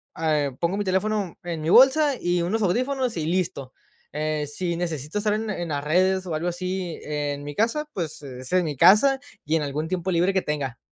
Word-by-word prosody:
a 155 -3 +1
eh, 140 - -3
pongo 170 +2 0
mi 205 - -1
teléfono 195 0 -1
en 170 -2 -4
mi 155 - -2
bolsa, 270 - +6
y 175 0 0
unos 210 +6 0
audífonos, 255 +5 0
y 155 -1 -2
listo. 170 -7 -2 0.4
Eh, 150 0 -2
si 170 +2 -2
necesito 165 0 -3
estar 210 0 +1
en 215 0 -2
en 175 -4 -4
las 145 -1 -2
redes 185 +4 +2
o 170 - -4
algo 155 +3 -2
así 180 0 -3
en 145 -1 -3
mi 145 0 -6
casa, 240 - 0
pues 160 -5 -4
es 130 -2 -8
en 180 -2 +3
mi 150 - -3
casa, 210 - +6 0.3
y 155 +2 +1
en 160 - +1
algún 150 +2 -3
tiempo 185 +1 -2
libre 180 +2 +2
que 190 - +2
tenga. 140 -7 -3
175 Hz, 215 wpm, -24 LUFS, 150-195 Hz, 0.4 s, bolsa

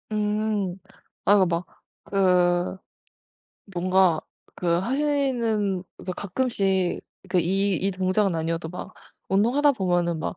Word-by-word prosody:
음. 210 -3 -1 0.5
아 205 - +6
그 190 - +4
막 170 +1 -1 0.4
그 180 -2 +2 1.0
뭔가 180 -2 +3 0.3
그 180 - -5
하시는 235 -5 0
그니까 185 - -5
가끔씩 195 -4 0 0.3
그 185 -1 +2
이 195 +3 +1
이 195 +4 0
동작은 185 +1 +1
아니어도 165 0 -2
막 180 +2 -8 0.3
운동하다 245 +9 +3
보면은 175 -6 0
막 155 - -4
190 Hz, 210 characters per minute, -25 LUFS, 180-210 Hz, 1.0 s, 아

